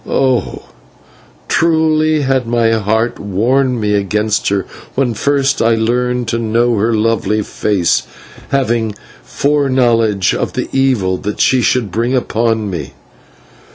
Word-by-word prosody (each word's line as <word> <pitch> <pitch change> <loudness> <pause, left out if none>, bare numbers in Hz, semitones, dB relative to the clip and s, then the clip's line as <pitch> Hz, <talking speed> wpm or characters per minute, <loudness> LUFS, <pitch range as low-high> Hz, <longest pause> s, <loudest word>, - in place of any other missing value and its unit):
Oh! 130 -3 0 0.8
truly 155 -1 +2
had 130 -3 0
my 115 -1 +2
heart 110 +2 0
warned 120 +6 0
me 105 -1 0
against 105 +2 0
her 100 -2 -1 0.3
when 130 -3 0
first 140 +3 0
I 115 0 +3
learned 125 +2 -1
to 115 - -1
know 115 +1 +1
her 110 +3 +1
lovely 110 -1 0
face, 100 -4 0 0.5
having 115 -5 0 0.3
foreknowledge 120 -9 +1
of - - -2
the - - -3
evil 125 -9 +1
that 105 +2 -5
she 130 -1 +3
should 120 -4 0
bring 120 +6 0
upon 115 -3 0
me. 85 -8 -5
115 Hz, 125 wpm, -15 LUFS, 105-130 Hz, 0.8 s, I